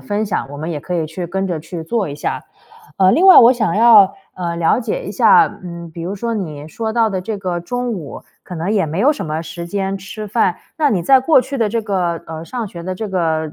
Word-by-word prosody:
分 210 Hz, +1 st, -2 dB
享， 185 Hz, -8 st, -2 dB
我 145 Hz, -, -8 dB
们 160 Hz, +3 st, -5 dB
也 155 Hz, -, -3 dB
可 180 Hz, -, -5 dB
以 165 Hz, -3 st, -1 dB
去 170 Hz, +3 st, -6 dB
跟 190 Hz, +3 st, -2 dB
着 175 Hz, -4 st, -2 dB
去 160 Hz, +2 st, -7 dB
做 195 Hz, +3 st, -2 dB
一 140 Hz, -, -6 dB
下。 145 Hz, -, -4 dB, 0.5 s
呃， 190 Hz, -1 st, +5 dB
另 360 Hz, +4 st, +3 dB
外 380 Hz, -, +10 dB
我 235 Hz, +1 st, +8 dB
想 215 Hz, -8 st, -1 dB
要， 215 Hz, -4 st, +6 dB, 0.2 s
呃， 170 Hz, -2 st, -4 dB
了 165 Hz, +5 st, +2 dB
解 -, -, -3 dB
一 -, -, -6 dB
下， 455 Hz, -3 st, +5 dB, 0.2 s
嗯， 170 Hz, -1 st, -8 dB
比 165 Hz, -, -9 dB
如 180 Hz, +4 st, -4 dB
说 230 Hz, +3 st, -3 dB
你 155 Hz, -8 st, -5 dB
说 220 Hz, +6 st, -4 dB
到 225 Hz, -1 st, +2 dB
的 190 Hz, -2 st, -2 dB
这 205 Hz, +3 st, -4 dB
个 185 Hz, -3 st, -3 dB
中 245 Hz, +6 st, -3 dB
午， 165 Hz, -9 st, -7 dB, 0.2 s
可 180 Hz, -, -9 dB
能 170 Hz, +3 st, -3 dB
也 195 Hz, -6 st, +1 dB
没 160 Hz, +4 st, -4 dB
有 290 Hz, +7 st, +4 dB
什 235 Hz, -, -6 dB
么 155 Hz, +1 st, -3 dB
时 170 Hz, +1 st, -7 dB
间 195 Hz, +1 st, -3 dB
吃 210 Hz, +3 st, -8 dB
饭， 200 Hz, -4 st, +1 dB, 0.2 s
那 300 Hz, -2 st, +3 dB
你 190 Hz, -9 st, 0 dB
在 265 Hz, +9 st, +5 dB
过 265 Hz, +2 st, +4 dB
去 265 Hz, +2 st, -5 dB
的 225 Hz, -3 st, +1 dB
这 230 Hz, +1 st, -2 dB
个 180 Hz, -5 st, -2 dB
呃 160 Hz, 0 st, -7 dB
上 235 Hz, +5 st, -5 dB
学 170 Hz, -3 st, -9 dB
的 185 Hz, +2 st, -4 dB
这 215 Hz, +3 st, -5 dB
个 160 Hz, -4 st, -1 dB
190 Hz, 275 characters per minute, -18 LUFS, 170-225 Hz, 0.5 s, 外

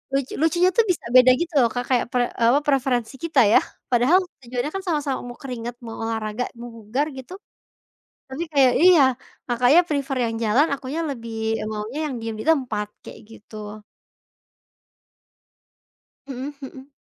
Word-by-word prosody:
lucu 275 Hz, -1 st, -2 dB
lucunya 345 Hz, +3 st, +3 dB
tuh 460 Hz, -, +5 dB
bisa 330 Hz, -, -4 dB
beda 255 Hz, 0 st, +8 dB
gitu 345 Hz, -1 st, -3 dB
loh 240 Hz, -, +5 dB
Kak 245 Hz, -, -1 dB
kayak 245 Hz, -, +2 dB
pre 245 Hz, -1 st, +2 dB, 0.2 s
eee, 230 Hz, -, +4 dB
apa -, -, +4 dB
preferensi 265 Hz, -4 st, 0 dB
kita 335 Hz, -1 st, +1 dB
ya 210 Hz, -, +6 dB, 0.3 s
padahal 250 Hz, +9 st, +4 dB, 0.2 s
tujuannya 250 Hz, +4 st, -4 dB
kan 390 Hz, -, -2 dB
sama-sama 295 Hz, -7 st, -2 dB
mau 245 Hz, 0 st, -9 dB
keringat 245 Hz, -3 st, -6 dB
mau 225 Hz, -, -8 dB
olahraga 220 Hz, +1 st, -3 dB, 0.2 s
mau 240 Hz, -, -7 dB
bugar 240 Hz, +8 st, -2 dB
gitu. 265 Hz, +8 st, -9 dB, 1.0 s
Tapi 265 Hz, +6 st, -5 dB
kayak 265 Hz, -3 st, +5 dB
iya, 360 Hz, -5 st, +7 dB, 0.4 s
Kakaknya 250 Hz, +6 st, +4 dB
prefer 280 Hz, -2 st, -2 dB
yang 225 Hz, -, -3 dB
jalan 250 Hz, +9 st, +3 dB
akunya 275 Hz, +4 st, -5 dB
lebih 230 Hz, -3 st, -7 dB, 0.4 s
maunya 215 Hz, +7 st, -5 dB
yang -, -, -4 dB
diem 225 Hz, -1 st, -4 dB
ditempat 245 Hz, -9 st, 0 dB, 0.2 s
kayak -, -, -11 dB
gitu. 215 Hz, -1 st, -10 dB, 2.5 s
Mhm 270 Hz, +2 st, -6 dB
mhm. 265 Hz, 0 st, -10 dB
255 Hz, 150 wpm, -23 LUFS, 230-290 Hz, 2.5 s, beda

